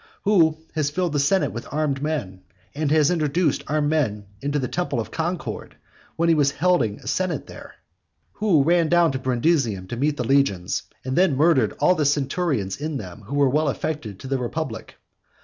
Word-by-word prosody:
who 165 -7 +4 0.2
has 155 -3 0
filled 175 +1 -1
the 145 - +1
senate 165 +7 +2
with 115 - -7
armed 145 -2 -1
men? 120 -12 -3 0.3
and 150 0 -1
has 155 +1 +4
introduced 155 -1 +1
armed 150 0 +1
men 110 -10 0 0.2
into 145 +1 -1
the 130 -3 -1
temple 175 -6 -2
of 110 - -4
Concord 170 +1 -4 0.4
when 170 +1 +1
he 165 - +5
was 145 -3 +2
holding 165 - +1
a - - -17
senate 185 -5 -1
there? - - -12 0.6
who 190 -9 +2
ran 170 +1 +3
down 175 -2 +4
to 130 - -3
Brundusium 125 - 0
to - - -3
meet 145 +4 0
the 125 - -1
legions, 115 -9 +1 0.2
and 130 0 -2
then 175 -7 +3
murdered 140 -8 +3
all 150 +5 +3
the 155 -4 0
centurions 140 - 0
in 150 0 -3
them 90 -5 -9
who 140 - -4
were 140 -2 +4
well 150 +2 +1
affected 130 -8 -4
to - - -8
the 135 0 -1
republic? 120 -2 -5
145 Hz, 190 wpm, -23 LUFS, 130-165 Hz, 0.6 s, he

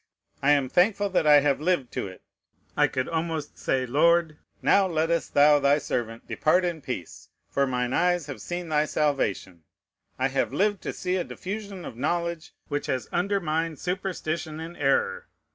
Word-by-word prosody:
I 140 - +2
am 140 -2 +2
thankful 200 - +2
that 180 -5 +1
I 145 -1 +8
have 140 0 +1
lived 155 -7 0
to - - -3
it; 95 -1 -12 0.5
I - - +4
could 130 0 -2
almost 160 -2 -3
say, 130 -1 0
Lord, 160 +4 +3 0.3
now 195 -1 +4
lettest 165 0 -1
thou 145 +1 +6
thy 140 +1 +4
servant 115 -5 -4
depart 180 +4 +2
in 170 -3 -3
peace, 125 -11 -7 0.2
for 140 0 +1
mine 125 -1 -1
eyes 175 -2 +2
have 140 -3 -7
seen 175 -1 -5
thy 150 -1 +2
salvation. 135 - -1 0.6
I 130 +1 +1
have 135 0 0
lived 205 0 +1
to - - -4
see 180 +1 -1
a 180 - 0
diffusion 200 -1 -6
of 115 - -8
knowledge 170 +3 -2 0.2
which 145 -1 -3
has 130 -4 -1
undermined 165 -4 -1
superstition 170 -4 -3
and 165 +2 -7
error. 135 -3 0
155 Hz, 170 wpm, -26 LUFS, 140-175 Hz, 0.6 s, I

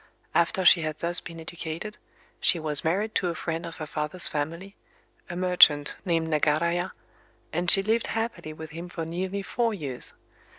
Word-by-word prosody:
After 180 +2 +2
she 175 - +7
had 155 -1 -3
thus 170 +1 0
been 165 0 -9
educated, 170 +5 -6 0.4
she 190 - +3
was 155 -3 +2
married 200 +7 0
to 185 - +1
a 170 - -2
friend 165 +1 -3
of 165 - -9
her 155 - -5
father's 150 +4 -1
family—a 170 +3 -7
merchant 175 -5 +5
named 165 -3 +1
Nagaraya;—and 170 +2 -2
she 195 0 +6
lived 225 +3 +1
happily 225 -8 -3
with 155 0 -9
him 170 +3 -7
for 165 -2 -4
nearly 185 +4 -3
four 230 +1 0
years. 140 -8 -6
170 Hz, 160 wpm, -27 LUFS, 155-185 Hz, 0.4 s, she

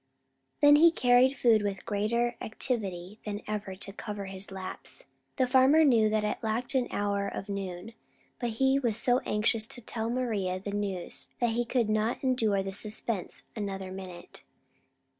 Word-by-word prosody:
Then 290 0 +8
he 335 +3 +8
carried 255 -2 +4
food 230 -3 +4
with 200 -2 -3
greater 235 +4 0
activity 210 -5 -4
than 205 0 -5
ever 210 -2 -4
to 195 +1 -7
cover 205 -1 -6
his 190 0 -6
lapse. 190 - -7 0.3
The 260 - +2
farmer 265 +5 +5
knew 225 -6 +5
that 215 0 +1
it 210 - -1
lacked 230 +4 -2
an 255 -2 +2
hour 200 -1 -1
of 195 +1 -6
noon, 195 +1 -5 0.5
but 240 - -1
he 265 +1 +3
was 235 -5 +1
so 245 +1 +3
anxious 215 +1 +1
to - - -6
tell 225 -1 -4
Maria 215 -7 -1
the 200 +2 -5
news 200 -4 -3
that 240 -2 +2
he 240 +1 0
could 235 -1 +1
not 215 +4 0
endure 225 -7 +2
the 195 0 -5
suspense 210 -1 -2
another 195 -3 -4
minute. 185 -2 -9
215 Hz, 165 wpm, -29 LUFS, 200-245 Hz, 0.5 s, Then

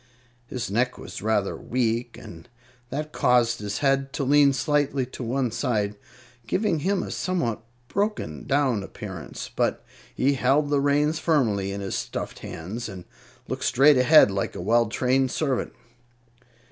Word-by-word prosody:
His 120 -3 -4
neck 125 +4 0
was - - -8
rather 105 -2 0
weak, 120 -1 -2
and 85 +8 -12 0.4
that 150 +4 -4
caused 120 -3 +2
his 105 -1 -4
head 135 0 +2
to 140 - -2
lean 140 +1 +5
slightly 140 0 0
to 130 - -10
one 125 +1 -1
side, 105 -5 -1 0.5
giving 185 - +1
him 190 +5 0
a - - -6
somewhat 165 - -1 0.3
broken 200 - -2
down 135 -6 +2
appearance; 95 -3 -8
but - - 0 0.3
he 140 +2 +2
held 140 +3 +2
the 145 -1 +3
reins 145 +3 +2
firmly 110 - +1
in 100 0 -5
his 95 - -4
stuffed - - -4
hands 105 +9 -6
and 95 -3 -9 0.4
looked - - -4
straight 140 +2 +5
ahead, 125 -4 +7
like 95 0 -2
a - - -5
well 115 +5 +3
trained 130 +4 +1
servant. 135 -2 -1
125 Hz, 150 wpm, -25 LUFS, 110-145 Hz, 0.5 s, ahead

